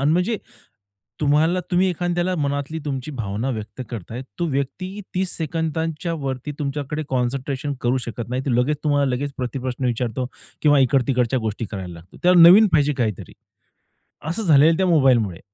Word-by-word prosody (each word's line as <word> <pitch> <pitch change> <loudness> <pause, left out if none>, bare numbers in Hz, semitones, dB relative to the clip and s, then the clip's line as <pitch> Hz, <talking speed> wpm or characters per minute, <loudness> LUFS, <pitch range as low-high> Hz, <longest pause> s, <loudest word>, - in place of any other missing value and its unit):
अन् 145 +3 +3
म्हणजे, 180 +6 +1 0.8
तुम्हाला 155 +5 +3
तुम्ही 185 +1 +3
एखाद्याला 175 +1 -1
मनातली 145 +1 -2
तुमची 135 0 -4
भावना 110 +3 -2
व्यक्त 110 -1 -6
करताय. 115 +2 -6 0.2
तो 175 - 0
व्यक्ती 180 +9 -3
30 185 0 0
सेकंदांच्या 160 +1 -2
वरती 135 +2 -3
तुमच्याकडे 145 +1 -3
कॉन्सन्ट्रेशन 130 +2 -2
करू 125 +2 +1
शकत 115 0 -5
नाही. 130 +2 -2
ते - - +1
लगेच 140 +5 +1
तुम्हाला 145 -1 +2
लगेच 140 +2 -3
प्रतिप्रश्न 125 +1 -3
विचारतो 125 +1 -1 0.4
किंवा 145 -2 +5
इकड-तिकडच्या 130 -1 +2
गोष्टी 110 +1 -3
करायला 95 -4 -6
लागतो. 85 +2 -15
त्यावर 180 0 +5
नवीन 180 +6 +9
पाहिजे 150 -1 +3
काहीतरी. 110 -4 -3 1.0
असं 205 +7 -2
झालेलं 160 -1 +5
त्या 190 - +2
मोबाईलमुळे 130 - +3
140 Hz, 150 wpm, -22 LUFS, 125-160 Hz, 1.0 s, नवीन